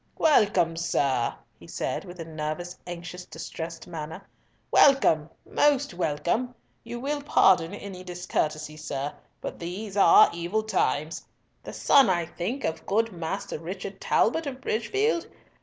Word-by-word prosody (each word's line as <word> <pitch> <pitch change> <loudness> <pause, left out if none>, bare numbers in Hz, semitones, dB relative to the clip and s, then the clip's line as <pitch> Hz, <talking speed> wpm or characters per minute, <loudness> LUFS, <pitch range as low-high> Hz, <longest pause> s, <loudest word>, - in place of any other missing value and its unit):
"Welcome, 195 - +3
sir," 140 -7 +1 0.2
he - - -14
said, - - -3
with 180 -1 -11
a 165 - -5
nervous 160 +3 -4
anxious 175 +1 -7
distressed 165 0 -7
manner. 160 +1 -7 0.4
"Welcome, 165 - +5 0.2
most 285 -5 +2
welcome. 175 +9 -1 0.3
You 240 +1 -6
will 285 +3 -2
pardon 190 - +4
any 195 -3 -8
discourtesy, 155 -4 -2
sir, 145 -2 -4 0.3
but - - -6
these 190 +4 -5
are 195 -4 +7
evil 175 +6 -1
times. 160 -7 0 0.4
The - - -8
son, 275 -7 +5
I 175 -2 +1
think, 190 +11 -4
of 160 - -3
good 225 +3 +1
Master 175 0 -4
Richard 190 +4 -7
Talbot 315 +7 +2
of 260 -2 -5
Bridgefield? 335 - 0
180 Hz, 135 wpm, -27 LUFS, 165-220 Hz, 0.4 s, are